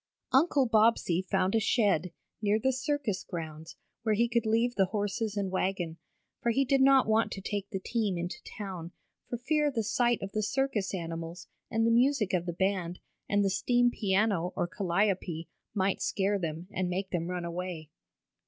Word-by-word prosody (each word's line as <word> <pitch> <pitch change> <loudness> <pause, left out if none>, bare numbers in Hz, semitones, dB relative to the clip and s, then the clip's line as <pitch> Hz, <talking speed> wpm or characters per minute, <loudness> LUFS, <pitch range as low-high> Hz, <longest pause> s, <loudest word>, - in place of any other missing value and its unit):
Uncle 275 0 +4
Bobbsey 220 -6 +3
found 190 0 0
a 225 - +4
shed, 200 - +2 0.3
near 210 0 +3
the 265 +4 +1
circus 265 -6 -1
grounds, 160 -3 -7 0.3
where 220 -2 +1
he 235 +3 +3
could 235 -1 0
leave 230 +2 +2
the 195 -4 +3
horses 205 +1 -2
and 195 -2 -1
wagon, 185 -3 -1 0.4
for 235 - +1
he 270 +4 +2
did 270 0 +3
not 270 -1 +6
want 220 +1 +2
to - - -4
take 200 0 -4
the 190 - -3
team 210 -2 -1
into 175 +7 -4 0.2
town, 185 -5 -6 0.4
for 240 - -2
fear 295 +4 +1
the 235 -5 -1
sight 240 +2 +2
of 195 - -5
the 215 - -1
circus 215 -4 0
animals, 165 0 -6 0.2
and 225 -1 +1
the 230 - +3
music 240 -4 +3
of 180 -1 0
the 175 - -2
band, 185 -1 -1 0.3
and 205 0 +3
the - - +3
steam 245 +4 +3
piano, 195 -4 +1
or - - +1
Calliope, 180 -2 -1 0.3
might 195 -1 +1
scare 200 0 +1
them, 165 0 -4
and 185 -1 -1
make 190 +2 -3
them 170 -2 -1
run 180 -1 -3
away. 170 -3 -5
200 Hz, 180 wpm, -30 LUFS, 180-230 Hz, 0.4 s, not